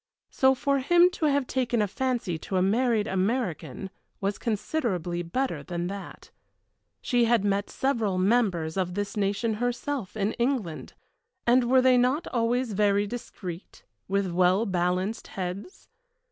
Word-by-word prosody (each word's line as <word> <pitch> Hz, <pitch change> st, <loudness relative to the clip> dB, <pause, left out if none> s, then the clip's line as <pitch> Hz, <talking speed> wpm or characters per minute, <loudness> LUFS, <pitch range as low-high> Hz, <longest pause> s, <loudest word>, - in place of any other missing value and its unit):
So 265 Hz, 0 st, +4 dB
for 275 Hz, +2 st, +1 dB
him 345 Hz, +6 st, +5 dB
to 330 Hz, -5 st, 0 dB
have 285 Hz, -2 st, +2 dB
taken 245 Hz, -2 st, 0 dB
a 210 Hz, -, +2 dB
fancy 230 Hz, -6 st, -2 dB
to 190 Hz, -, -3 dB
a -, -, +3 dB
married 225 Hz, +2 st, +2 dB
American 190 Hz, -, -2 dB, 0.3 s
was 200 Hz, 0 st, -2 dB
considerably 200 Hz, -, -2 dB
better 255 Hz, +11 st, -2 dB
than 175 Hz, -1 st, -4 dB
that. 200 Hz, 0 st, -9 dB, 0.7 s
She 245 Hz, -1 st, +2 dB
had 230 Hz, -3 st, +2 dB
met 200 Hz, 0 st, 0 dB
several 230 Hz, -8 st, 0 dB
members 185 Hz, -5 st, +1 dB
of 180 Hz, -1 st, -1 dB
this 205 Hz, +1 st, -3 dB
nation 205 Hz, +2 st, 0 dB
herself 245 Hz, -3 st, -2 dB
in 205 Hz, +1 st, 0 dB
England, 235 Hz, -, -1 dB, 0.5 s
and 240 Hz, 0 st, +4 dB
were 260 Hz, 0 st, +5 dB
they 255 Hz, -1 st, +5 dB
not 260 Hz, +6 st, +1 dB
always 240 Hz, 0 st, 0 dB
very 205 Hz, 0 st, +2 dB
discreet, 195 Hz, -5 st, -8 dB, 0.2 s
with 195 Hz, -1 st, 0 dB
well 185 Hz, +4 st, +3 dB
balanced 185 Hz, +2 st, -1 dB
heads! 190 Hz, -, -6 dB
210 Hz, 145 wpm, -27 LUFS, 185-250 Hz, 0.7 s, him